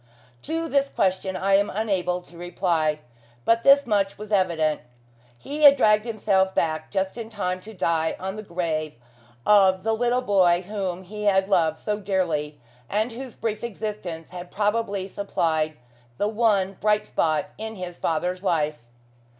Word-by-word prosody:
To 330 +1 -3
this 280 -2 +1
question 190 -2 0
I 195 +1 +1
am 200 +1 +1
unable 185 -4 -1
to 175 - -18
reply; 170 -3 -1 0.4
but 230 0 +3
this 275 +2 +6
much 200 -4 0
was 210 0 -9
evident: 170 -6 +1 0.6
he 290 - -6
had 285 -1 +9
dragged 210 -3 +4
himself 195 -4 +1
back 155 -1 -1
just 190 +3 -2
in 225 -1 -6
time 185 -4 -3
to 215 - -11
die 165 -3 0
on 190 +1 -4
the 215 - -6
grave 165 - -3 0.5
of 190 -3 +5
the 225 +1 +1
little 245 +2 +1
boy 185 -5 +3
whom 190 -2 -4
he 210 +3 -7
had 195 -1 +3
loved 160 -5 +2
so 210 +3 -3
dearly, 170 -7 -1 0.3
and 215 +4 0
whose 250 +1 -8
brief 220 -1 -3
existence 205 -7 -5
had 180 0 -8
probably 205 -2 -1
supplied 160 -6 -1 0.4
the 205 - +1
one 210 -3 +1
bright 210 0 +2
spot 155 -2 0
in 220 0 -5
his 180 -2 -7
father's 180 +3 -1
life. 155 -5 0
195 Hz, 160 wpm, -24 LUFS, 175-215 Hz, 0.6 s, had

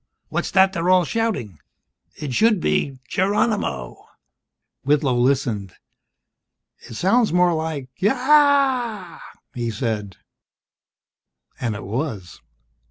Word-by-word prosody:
"What's - - -2
that 190 0 +4
they're 175 -1 -1
all 185 -1 +5
shouting? 200 - -2 0.6
It 145 -4 -5
should 220 - +3
be 135 -4 -1
'Geronimo' 210 - -1 0.4
..." - - -60
Whitlow 140 -1 +2
listened. 120 -7 0 1.0
"It - - -12
sounds 220 - +2
more 180 0 +3
like 160 -4 -3
'Eeeeeyaaaaa'," 255 - +2 0.3
he 120 -3 -3
said. 105 -4 -3 1.4
And 115 -4 -2
it 100 - -7
was. 105 - -5
165 Hz, 100 wpm, -22 LUFS, -, 1.4 s, all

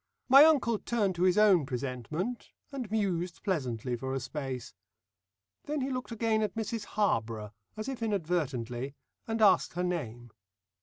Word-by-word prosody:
My 275 +3 +9
uncle 255 -9 +3
turned 210 -5 0
to 175 - -5
his 185 +1 +4
own 200 -6 +6
presentment, 135 - -4 0.2
and 260 -6 -5
mused 185 -5 -1
pleasantly 125 - -1
for 130 +2 -4
a - - 0
space. 130 -2 -5 0.9
Then 295 -1 -2
he 265 +1 -2
looked 255 -1 -4
again 225 -1 +1
at 210 -3 -1
Mrs 225 -1 -3
Harborough 115 - -1 0.2
as 215 - -4
if 265 -3 -5
inadvertently, 145 - -2 0.3
and 225 -1 0
asked 190 -4 +4
her 180 +2 -2
name. 120 -10 -4
180 Hz, 150 wpm, -30 LUFS, -, 0.9 s, My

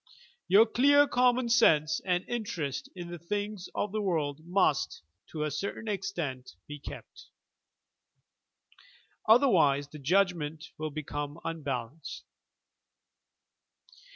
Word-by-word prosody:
Your 200 +5 +7
clear 285 +5 +5
common 250 -1 +2
sense 155 -11 +4
and 180 -1 0
interest 170 - -3
in 175 -1 -7
the 175 - -7
things 205 +2 -4
of 205 - -1
the 215 +1 -1
world 155 -7 -1
must, 175 - +1 0.3
to 155 -2 -3
a 150 - -2
certain 200 +8 -4
extent, 175 - -4
be 145 0 -8
kept. - - -10 2.0
Other 245 +5 +7
wise 145 - +3
the 150 - -10
judgment 160 -1 0
will 155 0 -2
become 145 0 -5
unbalanced. 145 -3 -5
170 Hz, 110 wpm, -29 LUFS, 150-205 Hz, 2.0 s, Your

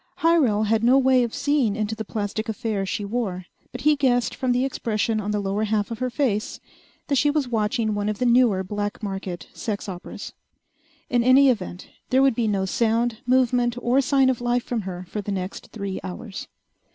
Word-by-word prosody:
Hyrel 285 -11 +3
had 220 +1 +1
no 250 +3 +5
way 260 -1 +4
of 235 -2 -1
seeing 280 -7 +1
into 215 0 -2
the 220 0 -4
plastic 215 +1 -3
affair 220 -4 -2
she 205 +1 -2
wore, 200 -5 -3 0.3
but 250 - -7
he 300 +3 +4
guessed 250 -4 +1
from 255 -1 -1
the 250 +2 +2
expression 225 -4 -1
on 205 - -4
the 210 0 0
lower 200 +2 -1
half 210 0 -1
of 230 - -5
her 255 0 -1
face 235 -5 -1 0.5
that 280 - 0
she 295 - +3
was 290 -3 0
watching 220 -1 0
one 205 0 -1
of 215 - -2
the 250 - 0
newer 235 -6 +4
black 205 +3 -4
market 190 -4 -5
sex 210 -2 -4
operas. 180 -2 -7 0.8
In 240 -2 +3
any 265 +2 +6
event, 185 -5 -5 0.2
there 260 +1 +4
would 270 -2 +4
be 225 -1 0
no 195 -2 0
sound, 230 +2 0
movement, 245 -1 +2
or 245 +3 +2
sign 270 0 +3
of 245 - -5
life 240 0 +1
from 240 -3 -2
her 180 0 -7
for 210 +4 -4
the 205 - -5
next 185 -1 -4
three 200 -3 -4
hours. 195 +2 -7
225 Hz, 200 wpm, -24 LUFS, 205-250 Hz, 0.8 s, any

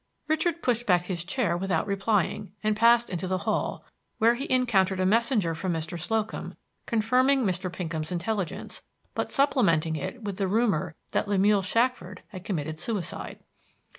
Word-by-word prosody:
Richard 320 +2 0
pushed 240 -1 +1
back 180 -2 +4
his 180 -2 -3
chair 190 -1 0
without 180 -2 0
replying, 200 0 0
and 215 0 +2
passed 235 +2 +5
into 180 0 -3
the 185 0 0
hall, - - -1 0.3
where 230 +2 +5
he 270 +4 -5
encountered 200 -7 +2
a 185 - +2
messenger 215 -4 +2
from 175 +2 -2
Mr. 165 +2 -4
Slocum, 220 +5 -2 0.3
confirming 255 +4 +3
Mr. 185 -2 -1
Pinkham's 160 -2 -4
intelligence, 185 0 -3 0.3
but - - -2
supplementing 170 - +2
it 225 - -5
with 200 -2 -4
the 195 - 0
rumor 190 -7 +1 0.2
that - - 0
Lemuel 200 0 +3
Shackford 205 -3 -1
had 185 -4 -9
committed 155 -5 -3
suicide. 190 -2 -4
200 Hz, 155 wpm, -27 LUFS, 175-230 Hz, 0.3 s, passed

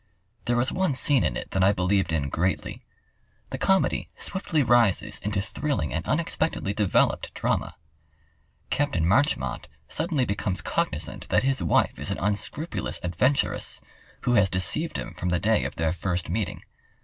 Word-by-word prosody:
There 120 - +1
was 120 +2 +2
one 185 -7 0
scene 135 0 +6
in - - 0
it - - -7
that 95 - +1
I 100 +2 +5
believed 95 -1 +1
in 75 -4 0
greatly. 90 +6 -2 0.7
The - - -4
comedy 190 0 +1
swiftly 170 -6 -1
rises 110 -4 +3
into 100 -1 -1
thrilling 100 - -2
and - - -2
unexpectedly 100 - -1
developed 105 -2 +1
drama. - - -1 1.0
Capt. 145 -10 0
Marchmont 80 - +1 0.2
suddenly 155 -5 0
becomes 100 -2 -2
cognizant - - -3
that - - +3
his 135 0 +1
wife - - +1
is - - -2
an - - -2
unscrupulous 105 - -1
adventuress, 125 +11 +1 0.4
who 120 - +1
has 100 -5 +4
deceived 120 - 0
him 85 - -6
from 90 +1 -3
the 90 - +2
day 110 +2 +2
of - - -4
their 80 0 0
first 90 -1 -2
meeting. 100 -1 -3
100 Hz, 155 wpm, -26 LUFS, 90-135 Hz, 1.0 s, scene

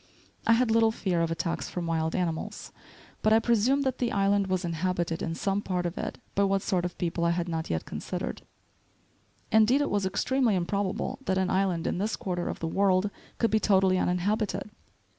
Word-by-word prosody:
I 230 - +7
had 235 0 +3
little 225 0 +5
fear 185 -6 -1
of 165 - +1
attacks 165 +1 -2
from 175 -1 -4
wild 160 -1 -1
animals, 170 -3 -3 0.5
but 215 - +3
I - - +7
presumed 240 +5 +2
that 260 -2 -1
the 240 -2 0
island 200 0 +2
was 185 -1 -1
inhabited 170 0 -1
in 165 - -2
some 195 +3 0
part 180 -3 -2
of 175 +1 -2
it, - - -4 0.2
by 200 - +2
what 195 0 +1
sort 180 -3 0
of 175 - -5
people 170 -1 -1
I 170 - +3
had 170 +1 0
not 165 -1 -3
yet 80 -1 -2
considered. - - -5 1.1
Indeed, 220 +5 +5
it 290 - 0
was 200 -2 +1
extremely 240 +3 +1
improbable 200 +7 -2
that 190 - +1
an 190 -1 +1
island 185 -3 +1
in - - -1
this 210 +3 0
quarter 175 -2 -3
of - - -4
the 165 - -1
world 195 +2 +2 0.3
could 230 - +1
be 220 - +3
totally 190 -3 +3
uninhabited. 200 +3 -1
190 Hz, 200 wpm, -28 LUFS, 175-215 Hz, 1.1 s, I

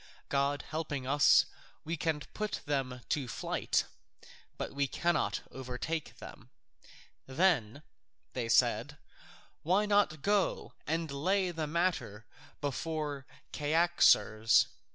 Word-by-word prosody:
God 140 +1 0
helping 150 -4 -3
us, 140 -1 +5 0.4
we 165 +2 -3
can 160 -2 -1
put 215 -1 -3
them 135 -4 -2
to 140 -4 0
flight, 110 - -1 0.7
but - - -4
we 140 0 0
cannot 175 +5 0
overtake 130 +5 -5
them." - - -12 0.8
"Then," 140 - +1 0.6
said 120 +1 +3
they, 150 - -12 0.7
"why 190 +6 +2
not 200 -8 +2
go 205 -2 +1
and 160 -1 -1
lay 185 +6 +1
the 160 -2 -3
matter 145 - -1 0.4
before 145 -1 -3 0.3
Cyaxares?" 145 - +4
150 Hz, 105 wpm, -32 LUFS, 130-170 Hz, 0.8 s, us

